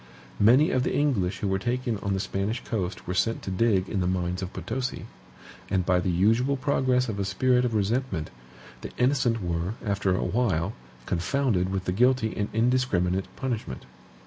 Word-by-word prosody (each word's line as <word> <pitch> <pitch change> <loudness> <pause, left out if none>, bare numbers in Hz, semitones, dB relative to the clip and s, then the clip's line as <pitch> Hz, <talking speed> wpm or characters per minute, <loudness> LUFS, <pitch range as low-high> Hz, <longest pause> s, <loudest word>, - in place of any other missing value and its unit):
Many 125 +9 +5
of 130 - +2
the - - -1
English 100 -10 0
who 100 - 0
were 95 0 0
taken 120 0 -1
on 100 -1 -1
the - - -1
Spanish 100 +4 -2
coast 95 -6 -3
were 90 - -3
sent 115 +5 0
to 95 - -4
dig 95 -1 +2
in 100 - -2
the 90 - 0
mines 90 0 -1
of 95 -1 -4
Potosi; 125 +2 -4 0.6
and 95 -3 +1
by 90 -1 +3
the 90 - -1
usual 115 +10 +2
progress 130 -2 +1
of 105 -3 -4
a - - +1
spirit 125 +6 +2
of 115 -2 -1
resentment, 105 -5 -1 0.5
the - - -6
innocent 125 -4 +2
were, 85 +4 -2
after 100 -2 +1
a - - -1
while, 100 -5 0 0.3
confounded 95 0 0
with 95 0 -3
the - - 0
guilty 125 +3 +3
in 105 -1 -3
indiscriminate 110 -6 +1
punishment. 115 - -4
105 Hz, 180 wpm, -26 LUFS, 95-125 Hz, 0.6 s, Many